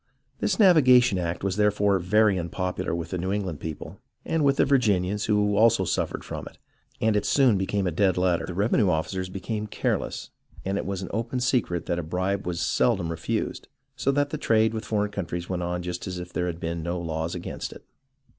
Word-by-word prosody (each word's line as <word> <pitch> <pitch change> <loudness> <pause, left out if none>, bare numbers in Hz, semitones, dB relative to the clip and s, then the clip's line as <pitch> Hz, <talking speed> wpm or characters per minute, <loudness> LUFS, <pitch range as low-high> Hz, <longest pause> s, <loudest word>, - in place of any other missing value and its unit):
This - - 0
navigation 130 - +6
act 85 0 -3
was 100 0 -1
therefore 105 -2 +3
very 100 +2 +3
unpopular 90 +1 -3
with 85 0 -5
the 90 - -2
New 95 +2 -2
England 95 -7 -2
people, 80 -2 -7 0.3
and 165 -2 0
with 140 -1 +3
the - - +4
Virginians, 105 -7 +2
who 105 -1 +2
also 110 -2 +4
suffered - - -2
from - - -6
it, - - -13 0.4
and 110 -1 +2
it 105 - +1
soon 130 -3 +4
became 95 +1 -1
a 90 - 0
dead 95 +2 +2
letter. 90 -2 +1
The 90 - -5
revenue 105 0 +2
officers 90 +3 -1
became 105 +3 -4
careless, - - -2 0.3
and 95 +1 -1
it - - -4
was 95 -1 -3
an - - -6
open 115 +4 -2
secret 120 -9 0
that 85 - -1
a - - -3
bribe 95 +4 -2
was 85 -1 -2
seldom 100 -7 +1
refused, 80 -1 -3 0.3
so 140 - +1
that 145 0 +1
the 155 - -3
trade 110 -4 +3
with 110 0 -4
for 105 -1 0
eign - - -14
countries 85 -3 -4
went 90 -1 -2
on 90 0 -2
just 90 +1 -5
as 90 -1 -4
if 90 0 -8
there 90 - -1
had 85 -1 -4
been 85 0 -3
no 85 +2 -3
laws 80 0 -3
against 90 - -5
it. - - -13
95 Hz, 210 wpm, -26 LUFS, 90-110 Hz, 0.4 s, navigation